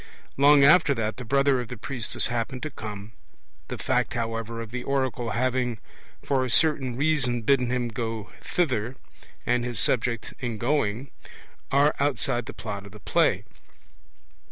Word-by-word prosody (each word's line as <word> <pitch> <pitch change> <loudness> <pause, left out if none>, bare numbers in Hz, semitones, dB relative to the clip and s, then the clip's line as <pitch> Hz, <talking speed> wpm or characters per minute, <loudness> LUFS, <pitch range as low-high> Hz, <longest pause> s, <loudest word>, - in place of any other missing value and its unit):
Long 140 +1 +6
after 150 0 +6
that 110 -2 -2
the 125 - -6
brother 140 0 +3
of 120 - -7
the 125 - -7
priestess 120 +1 -3
happened 120 +2 -2
to 155 - -3
come; 105 -2 -7 0.6
the - - -5
fact, - - 0
however, 115 0 -3
of 115 -1 -7
the 125 0 -4
oracle 130 -3 -1
having 125 +1 0 0.5
for 135 -2 +1
a 130 - -2
certain 135 -3 +2
reason 135 -5 +1
bidden 125 0 +3
him 125 -1 0
go 115 -2 -4
thither, 130 -8 -1 0.5
and 120 0 +1
his 120 -4 +2
object 115 -2 -1
in 120 -4 -3
going, 125 0 0 0.6
are 145 +2 +4
outside 130 -4 0
the - - -5
Plot 100 -1 -6
of 100 - -14
the 105 - -11
play. - - +2
125 Hz, 155 wpm, -26 LUFS, 115-135 Hz, 0.6 s, Long